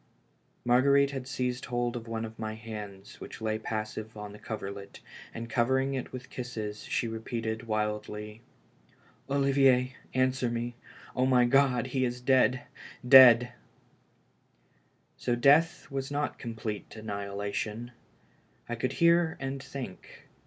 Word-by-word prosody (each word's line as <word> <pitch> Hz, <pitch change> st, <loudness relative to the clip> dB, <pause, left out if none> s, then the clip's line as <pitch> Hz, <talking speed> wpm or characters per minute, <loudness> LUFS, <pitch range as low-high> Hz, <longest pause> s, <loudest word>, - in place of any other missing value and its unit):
Marguerite 140 Hz, +3 st, +4 dB
had 135 Hz, -2 st, -5 dB
seized 125 Hz, -2 st, -2 dB
hold 120 Hz, 0 st, -1 dB
of 115 Hz, -1 st, -6 dB
one 115 Hz, 0 st, -3 dB
of 110 Hz, 0 st, -10 dB
my 110 Hz, -1 st, -3 dB
hands 105 Hz, -3 st, -9 dB
wliich -, -, -8 dB
lay 110 Hz, -1 st, -1 dB
passive 110 Hz, 0 st, -5 dB
on 105 Hz, 0 st, -7 dB
the 105 Hz, -, -12 dB
coverlet, 100 Hz, -2 st, -7 dB, 0.3 s
and 115 Hz, 0 st, -6 dB
covering 130 Hz, +4 st, +1 dB
it 130 Hz, -2 st, -4 dB
with 130 Hz, 0 st, -9 dB
kisses 110 Hz, -4 st, -5 dB
she 115 Hz, -, -1 dB
repeated, 115 Hz, 0 st, -4 dB
wildly: 105 Hz, 0 st, -3 dB, 0.9 s
"Olivier, 135 Hz, -2 st, +3 dB, 0.2 s
answer 130 Hz, -1 st, +2 dB
me. 120 Hz, +1 st, -3 dB, 0.4 s
Oh, 130 Hz, 0 st, +2 dB
my 125 Hz, -2 st, +5 dB
God 130 Hz, -1 st, +3 dB
I -, -, -6 dB
he 130 Hz, 0 st, 0 dB
is 125 Hz, -1 st, -1 dB
dead, 130 Hz, +1 st, +3 dB, 0.4 s
dead 125 Hz, -2 st, +10 dB
I 120 Hz, 0 st, -9 dB, 0.8 s
" -, -, -29 dB
So 120 Hz, -, +2 dB
death 145 Hz, +5 st, +3 dB
was 135 Hz, 0 st, -3 dB
not 145 Hz, 0 st, -2 dB
complete 110 Hz, -3 st, -5 dB
annihilation. 105 Hz, +2 st, -4 dB, 0.8 s
I 120 Hz, -, -4 dB
could 120 Hz, +2 st, -2 dB
hear 170 Hz, -1 st, +3 dB
and 135 Hz, 0 st, -4 dB
think. 135 Hz, -8 st, -9 dB
120 Hz, 140 wpm, -29 LUFS, 110-130 Hz, 0.9 s, dead